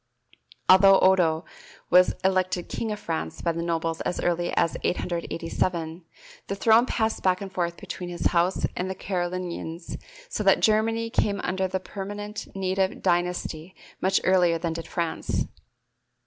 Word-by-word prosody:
Although 195 +1 +8
Odo 175 -4 +3 0.5
was 180 +1 +6
elected 185 -1 +1
king 225 - -3
of 210 - -4
France 160 - -4
by 170 - +2
the 165 0 -3
nobles 165 -1 -1
as - - -2
early 175 0 0
as 165 - +2
887, 170 -1 -2 0.4
the 200 - -2
throne 225 +4 +4
passed 220 -1 0
back 185 -1 +2
and 195 -1 -7
forth 170 -2 -1
between 180 -3 -6
his 175 -1 -5
house 175 +2 +2
and 185 +1 -2
the 190 - -3
Carolingians, 175 -2 -4 0.3
so - - -3
that - - +5
Germany 225 +1 +2
came 205 -4 +1
under 190 +1 -1
a 190 0 -1
permanent 205 +2 -6
native 190 0 -1
dynasty 175 -1 -1 0.3
much 190 +1 +3
earlier 180 -3 +4
than 165 0 -2
did 165 0 -6
France. 170 -2 -2
185 Hz, 150 wpm, -26 LUFS, 170-195 Hz, 0.5 s, Although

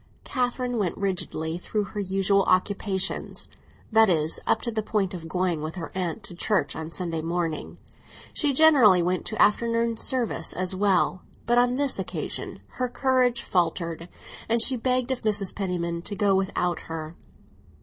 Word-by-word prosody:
Catherine 250 -2 -1
went 185 -5 -1
rigidly 175 -4 -2
through 210 +3 -2
her 205 +1 -6
usual 195 0 +2
occupations; 190 +1 0 0.4
that 220 -1 +6
is, 160 -2 +1
up - - +3
to 235 - -2
the 220 -1 -1
point 205 -3 -1
of 165 -3 -7
going 180 -2 -1
with 155 +2 -5
her 170 -3 -6
aunt 180 -3 -3
to - - -5
church 175 -4 0
on 160 0 -6
Sunday 165 -2 -3
morning. 165 -1 -3 0.6
She 295 -3 +1
generally 260 - +6
went 180 +1 -1
to 220 - -3
afternoon 230 +1 +2
service 250 -1 -1
as 185 +1 -2
well; 190 -2 +2 0.2
but 240 +1 +4
on 245 0 +3
this 280 0 +1
occasion - - -5 0.2
her 250 -1 0
courage 250 -2 +1
faltered, 170 -1 -1 0.4
and 230 +1 +3
she 255 +3 +4
begged 255 +1 0
of 260 - -2
Mrs. 210 -3 0
Penniman 170 -3 -2
to 205 +4 -6
go 200 -1 +2
without 190 -2 0
her. 160 -1 -5
195 Hz, 160 wpm, -26 LUFS, 175-235 Hz, 0.6 s, that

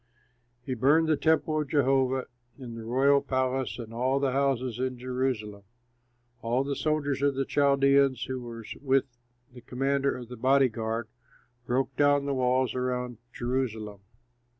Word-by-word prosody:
He 130 - -2
burned 145 +7 +3
the 155 - +3
temple 155 0 +1
of 145 - -6
Jehovah 135 -2 +2 0.3
and 125 -4 -8
the 115 -1 -8
royal 135 +4 +3
palace 130 -4 -1
and 115 -2 -8
all 130 +3 +1
the 140 -1 +1
houses 130 -3 0
in 130 -1 -2
Jerusalem. 125 -5 -3 0.8
All 120 +3 0
the 140 0 -3
soldiers 145 -3 -1
of 140 -1 +2
the 135 0 -1
Chaldeans, 140 -2 +3
who 130 -1 -4
were 115 -2 -8 0.2
with 135 -1 +2 0.5
the 125 - -12
commander 135 +3 -1
of 125 -2 -9
the 125 - -8
body 130 +2 +4
guard, 115 0 -3 0.6
broke 130 +1 0
down 145 -1 +3
the 140 - -1
walls 130 0 +1
around 125 -2 -3
Jerusalem. 115 -5 -3
130 Hz, 150 wpm, -28 LUFS, 125-140 Hz, 0.8 s, body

